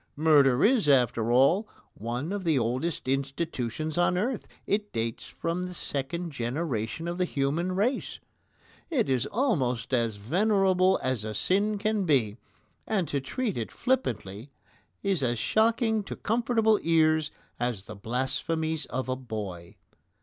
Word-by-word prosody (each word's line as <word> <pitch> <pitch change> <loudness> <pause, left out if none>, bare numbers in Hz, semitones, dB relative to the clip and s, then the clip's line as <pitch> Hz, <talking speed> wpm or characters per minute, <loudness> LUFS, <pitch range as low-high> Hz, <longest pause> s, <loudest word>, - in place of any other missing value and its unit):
Murder 145 -4 +5
is, 225 - +3
after 120 -4 +3
all, 160 - +4 0.2
one 120 - -4
of 205 -2 -3
the 160 -5 +2
oldest 130 +7 -1
institutions 140 +2 -2
on 175 0 +3
earth. 235 +5 -1 0.2
It 205 0 -1
dates 115 0 -3
from 175 +2 -3
the 180 - -7
second 165 +4 -3
generation 130 +2 -3
of 175 +1 -3
the 180 - +3
human 160 +5 -1
race. 220 +8 -1 0.7
It 265 -10 +1
is 130 -3 +1
almost 140 - 0
as 115 -3 +1
venerable 185 - +2
as 130 -4 -1
a 110 0 -5
sin 205 - +1
can 210 -1 0
be, 120 -9 +2 0.5
and 195 -6 0
to 140 - -1
treat 200 - -2
it 115 - -4
flippantly 120 - -2 0.5
is 195 -6 +1
as 120 -2 0
shocking 220 - +2
to - - -5
comfortable 225 -1 +2
ears 160 -2 +3 0.3
as 120 -5 -2
the 105 - -8
blasphemies 145 +8 -1
of 130 +2 -3
a 130 - 0
boy. 105 -9 -6
155 Hz, 140 wpm, -28 LUFS, 125-195 Hz, 0.7 s, Murder